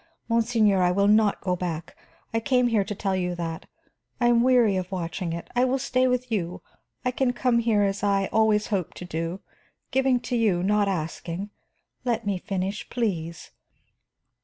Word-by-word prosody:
Monseigneur, 225 -4 +3
I 180 - +4
will 200 +2 +2
not 210 0 +3
go 180 -2 0
back; 170 -2 -5 0.4
I 225 - +2
came 250 0 +2
here 220 -4 +2
to 210 - -4
tell 195 -1 -1
you 180 -1 -1
that. 165 -1 -5 0.5
I 240 -1 +3
am 235 -1 +4
weary 245 -5 +4
of 185 0 -3
watching 175 -1 -3
it; 170 0 -5
I 245 - +3
will 260 +1 +2
stay 255 0 +1
with 250 -1 -1
you. 180 -5 -2 0.4
I 250 - +2
can 250 0 0
come 245 -1 +2
here 225 -3 +2
as 195 0 -1
I 195 -1 +2
always 215 -1 +3
hoped 185 -4 -2
to 180 - -7
do, 165 +2 -4 0.5
giving 265 -1 +2
to 250 - -3
you, 205 -7 +2
not 205 +1 +2
asking. 175 +2 -4 0.5
Let 235 -2 -1
me 200 -2 -1
finish, 195 +2 -3
please. 170 -9 -3
205 Hz, 180 wpm, -25 LUFS, 180-235 Hz, 0.5 s, I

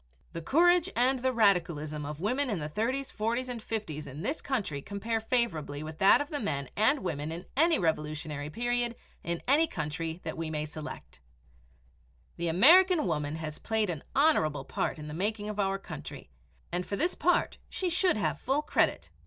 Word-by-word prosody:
The 165 - -5
courage 350 - +4
and 255 +2 +3
the 260 +1 +1
radicalism 165 - +1
of 150 0 -6
women 250 +9 0
of 205 - -1
the 150 -2 -3
30's, 265 +4 -1
40's, 235 +4 -1
and 245 -2 -5
50's 170 -10 -4
in 145 +5 -7
this 285 +9 -2
country 200 - -2
compare 220 +6 -2
favorably 165 - -1
with 155 0 -8
that 195 +8 +6
of 290 - -4
the 295 - -2
men 140 - -2
and 220 +5 +3
women 155 -3 -3
in 170 +3 -6
any 325 +3 +4
revolutionary 150 -2 -2
period 240 +4 -1 0.3
in 170 0 -3
any 300 +5 +4
country 160 - -4
that 160 - -4
we 165 -1 -3
may 150 -1 -2
select. 150 - -8 1.2
The 170 - -2
American 325 - +6
woman 150 -3 -1
has 155 -1 -6
played 220 -4 0
an 155 -4 -6
honorable 155 - +3
part - - -2
in 150 -1 -8
the 150 - -6
making 205 +4 -2
of 210 0 -5
our 195 -1 +1
country, 75 - -9 0.4
and 175 +1 -1
for 200 - -4
this 345 - +1
part 355 +3 +1
she 365 -2 -2
should 365 - +3
have 210 - -1
full 275 +4 0
credit. - - +1
200 Hz, 185 wpm, -30 LUFS, 155-255 Hz, 1.2 s, that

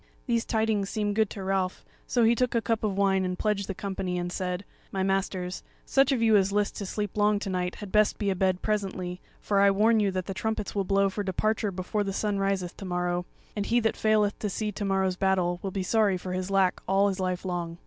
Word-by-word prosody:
These 235 -3 0
tidings 220 -3 0
seemed 205 -1 -1
good 220 -2 +2
to 195 - -7
Ralph; 190 -1 -1 0.2
so 240 - +2
he 225 +1 +5
took 250 0 0
a - - +4
cup 225 +1 -1
of 200 -3 -1
wine 195 -1 +3
and 180 0 -2
pledged 205 -2 0
the 195 - -4
company, 190 -3 -3
and 175 0 -3
said: 180 +1 -3 0.3
"My 190 -1 -1
masters, 190 -1 -1 0.2
such 270 0 +3
of 245 -4 +1
you 220 -1 +5
as 195 -1 +3
list 205 0 0
to 200 - -4
sleep 205 0 -3
long 210 0 +3
to 200 -1 -4
night 180 -1 -1
had 205 -3 -8
best 215 0 +3
be 200 -2 0
abed 185 -1 0
presently, 190 -4 -2 0.2
for 200 -1 +1
I 200 0 +6
warn 215 +3 +4
you 205 -2 +2
that 185 -1 -2
the 195 - -4
trumpets 220 +1 -3
will 200 -1 0
blow 195 +1 +3
for 205 - -3
departure 210 +2 0
before 190 +3 -2
the 195 -1 -3
sun 205 0 -1
riseth 195 -3 -1
to 195 - -7
morrow; 180 -1 -1 0.3
and 205 -1 -2
he 240 - +3
that 225 - +1
faileth 215 -1 +2
to 210 - -2
see 210 +2 -2
to 205 - -5
morrow's 190 -1 +1
battle 180 -2 +1
will 195 - -3
be 190 0 -3
sorry 205 -1 +2
for 180 0 -5
his 185 +1 -3
lack 195 -2 +2
all 195 +1 +4
his 195 -1 -2
life 185 0 -2
long." 175 -2 -3
195 Hz, 240 wpm, -27 LUFS, 185-210 Hz, 0.3 s, I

